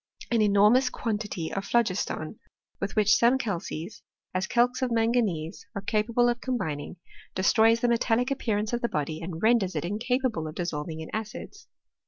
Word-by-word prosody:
An 230 -2 +3
enormous 210 +5 +5
quantity 210 -9 -3
of 195 - -2
phlogiston 205 -5 -1 0.4
with 200 0 -3
which 215 -1 +5
some 240 +3 +4
calces, 195 -4 -4 0.3
as 185 +1 -1
calx 245 +2 +2
of 255 - +1
manganese, 225 -8 0
are 200 - -3
capable 225 +3 +2
of 240 0 0
combining, 175 - -3 0.4
destroys 225 +4 +4
the 245 - +3
metallic 235 +1 +1
appear 235 -6 0
ance 215 +2 -2
of 240 - 0
the 235 - 0
body, 155 +2 -3
and 165 +1 -6
renders 220 -5 +3
it - - -2
incapable 230 -3 -1
of 155 - -8
dissolv 165 -3 -3
ing 160 0 -6
in 160 - -7
acids. 220 -1 -6
215 Hz, 170 wpm, -27 LUFS, 180-235 Hz, 0.4 s, enormous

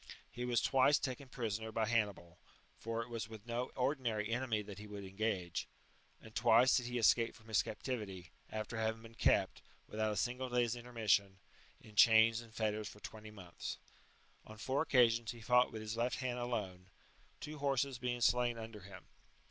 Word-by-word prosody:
He 120 - -4
was 120 -2 +1
twice 135 +2 +4
taken 130 0 -4
prisoner 110 -3 -3
by 110 0 0
Hannibal, 100 -6 -1 0.4
(for 115 0 -3
it 115 - -13
was 115 -1 -4
with 110 -2 -10
no 120 +1 -2
ordinary 125 -5 0
enemy 120 -3 0
that 100 -1 -9
he 105 - -9
would 100 -1 -7
engage,) 95 -3 -2 0.5
and 110 - -14
twice 120 +3 +5
did 125 -2 0
he 125 0 -2
escape 115 0 +3
from 110 0 -17
his 110 - +4
captivity, 105 - -5 0.2
after 110 +1 -4
having 110 0 -1
been 115 0 -12
kept, - - +2 0.3
without 110 0 -1
a - - -2
single 125 +1 -1
day's 120 -1 +1
intermission, 110 -5 +1 0.4
in 110 -1 -16
chains 110 +1 +6
and 115 -2 -15
fetters 110 -1 -1
for 105 - -13
twenty 110 0 -9
months. 95 -5 -7 0.7
On 110 - -11
four 130 +6 0
occasions 120 -5 +3
he 120 - -12
fought 125 +2 +4
with 110 -1 -6
his 110 +1 -4
left 120 +2 0
hand 125 -2 -3
alone, 100 -7 -3 0.5
two 150 0 -7
horses 140 -2 0
being 120 -1 -2
slain 120 0 +3
under 110 -1 -7
him. 95 -1 -12
115 Hz, 180 wpm, -36 LUFS, 105-125 Hz, 0.7 s, chains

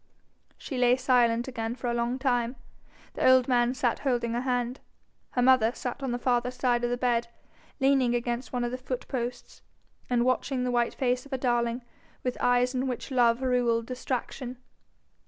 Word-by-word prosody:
She 265 -4 -5
lay 245 0 +5
silent 245 -2 +2
again 230 -2 -3
for 255 - -8
a 240 - 0
long 235 +1 -1
time. 245 -2 0 0.6
The - - +3
old 255 -1 +5
man 245 -1 +2
sat 245 -2 0
holding 240 -4 0
her 240 - -1
hand; 250 0 -1 0.5
her 245 - +1
mother 250 -3 +5
sat 250 +2 -5
on 270 - -2
the 240 - -1
farther 245 0 +1
side 250 -1 0
of 240 - +1
the 245 - -1
bed, 240 -1 +1 0.5
leaning 265 -3 +3
against 240 +1 -3
one 245 -1 -1
of 240 - -2
the 255 - -4
foot 255 -1 -5
posts, 245 -1 -5 0.5
and 240 -1 +2
watching 255 0 0
the 250 - 0
white 240 -1 +1
face 250 -1 0
of 280 - -15
her 265 - -1
darling 240 -1 0 0.4
with 250 -1 -1
eyes 245 +1 +3
in 260 +1 -1
which 250 +2 -4
love 240 -1 +3
ruled 240 -3 +1
distraction. 255 0 -4
245 Hz, 185 wpm, -28 LUFS, 240-255 Hz, 0.6 s, lay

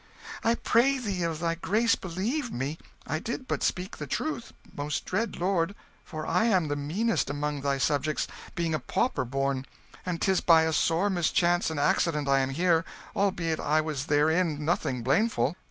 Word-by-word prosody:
"I 230 +1 +3
pray 255 +5 +3
thee 200 -8 -3
of 165 -2 -1
thy 165 0 0
grace 215 +7 +2
believe 220 - -2
me, 140 +6 -3 0.3
I 155 - -2
did 235 +7 -5
but - - -1
speak 185 +1 -1
the 150 - -6
truth, 305 - -3 0.2
most 145 +1 -3
dread 220 +5 -1
lord; 185 +1 0 0.3
for 155 -2 -6
I 225 - +2
am 185 -9 +2
the 145 - 0
meanest 175 +12 0
among 145 0 -2
thy 140 0 0
subjects, 150 +2 0 0.3
being 170 -2 -1
a 155 - +1
pauper 140 - 0
born, 135 +1 -1 0.4
and 175 -2 -3
'tis 190 -2 +2
by 165 -2 +6
a 160 0 0
sore 170 +6 +2
mischance 175 -1 +2
and 160 -2 -3
accident 150 0 +1
I 135 0 +4
am 135 0 0
here, 165 +3 +2 0.3
albeit 180 -5 0
I 155 +1 +2
was 150 -3 -4
therein 155 +1 +2
nothing 135 -7 0
blameful. 155 - +2
165 Hz, 175 wpm, -28 LUFS, 145-190 Hz, 0.4 s, by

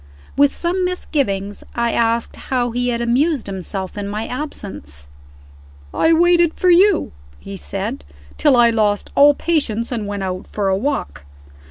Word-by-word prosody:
With 285 0 +4
some 360 +2 -1
misgivings, 245 - -2
I 235 -1 0
asked 230 0 0
how 245 -3 -2
he 245 +1 -1
had 235 -1 -1
amused 260 +4 +1
himself 190 0 -5
in 200 - -4
my 210 +2 -3
absence. 195 - -7 0.9
"I 325 - +2
waited 345 0 +4
for 365 - +3
you," 375 +1 +4 0.3
he 100 +8 -9
said, 70 -3 -5 0.3
"till 285 -4 +3
I 235 -1 +5
lost 210 -2 0
all 285 +1 +6
patience, 250 -10 -1
and 220 -4 -3
went 200 -1 -4
out 185 0 -4
for 200 -2 -1
a 190 - +2
walk. 190 - -3
235 Hz, 155 wpm, -19 LUFS, 200-295 Hz, 0.9 s, all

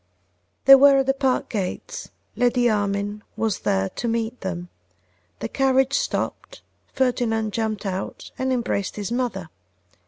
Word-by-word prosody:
They 275 - +10
were 275 +1 +8
at 270 - +2
the 270 - +2
park 270 -2 0
gates: 215 - -4 0.3
Lady 245 0 +2
Armine 205 -1 -1 0.2
was 220 -3 0
there 95 0 +1
to 240 - -4
meet 230 +1 -2
them. 180 -2 -4 0.7
The 115 - -2
carriage 265 - +2
stopped; - - -2 0.3
Ferdinand 235 -4 0
jumped 220 -2 -2
out 190 0 -5
and 260 0 0
embraced 235 -6 -1
his 205 +1 -4
mother. 235 -8 -2
230 Hz, 135 wpm, -23 LUFS, 200-260 Hz, 0.7 s, They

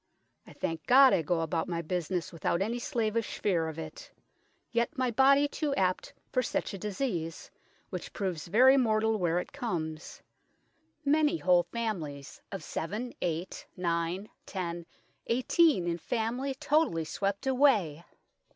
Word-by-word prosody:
I - - -12
thank 165 -1 -4
God 265 +1 +8
I - - +3
goe 165 +2 0
about 165 0 -1
my 170 -1 -2
buisnes 175 +1 -2
without 170 +1 0
any 235 +4 -2
slavish 230 -3 -1
feare 170 -5 +1
of 160 - -8
it; 160 -1 -8 0.6
yet 235 +6 0
my 255 -1 +1
body 275 +4 +5
too 290 -1 -2
apt 185 -1 0 0.2
for 255 - +2
such 235 - -2
a 195 - -6
disease, 185 -6 -3 0.4
which - - -5
proves 180 -6 -3
very 255 +9 +6
mortal 220 -3 +2
where 175 -1 +1
it 180 - -4
comes; 165 - -4 0.8
many 300 +3 +3
whole 180 - +3
familyes 165 - -5
of 195 - -5
7, 215 +9 -4
8, 170 +2 -3
9, 175 +3 -1 0.2
10, 170 -3 -4 0.4
18 255 - +3
in 170 0 0
family 245 - -2
totally 290 - +1
swept 200 - -2
away. 240 - +3
200 Hz, 140 wpm, -30 LUFS, 170-250 Hz, 0.8 s, God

